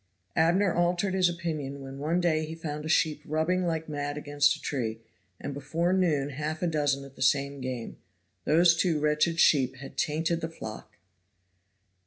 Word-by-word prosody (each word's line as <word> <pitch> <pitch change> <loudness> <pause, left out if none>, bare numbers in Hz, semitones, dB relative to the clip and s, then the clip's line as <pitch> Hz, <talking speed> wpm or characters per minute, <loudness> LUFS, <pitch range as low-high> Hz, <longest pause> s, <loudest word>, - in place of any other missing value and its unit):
Abner 175 +4 +3
altered 175 +2 +1
his 185 -2 +3
opinion 155 -5 -4
when 135 0 -8
one 160 +5 0
day 160 -3 +1
he 160 +1 -6
found 150 -2 -5
a - - -4
sheep 155 -3 +2
rubbing 170 +5 0
like 160 -1 -2
mad 145 -1 -3
against 145 -1 +2
a - - -11
tree, 115 -5 -3 0.4
and 140 - -5
before 165 +6 -1
noon 155 -7 +1
half 155 +4 -4
a - - +3
dozen 145 -4 0
at 135 -1 -14
the - - -13
same 140 +1 +1
game. 125 -3 -5 0.5
Those 170 +2 +5
two 165 -2 +1
wretched 150 +3 +1
sheep 130 -5 +4
had 135 +1 -11
tainted 160 +2 0
the 160 - -3
flock. 110 -9 -9
155 Hz, 175 wpm, -28 LUFS, 140-170 Hz, 0.5 s, Those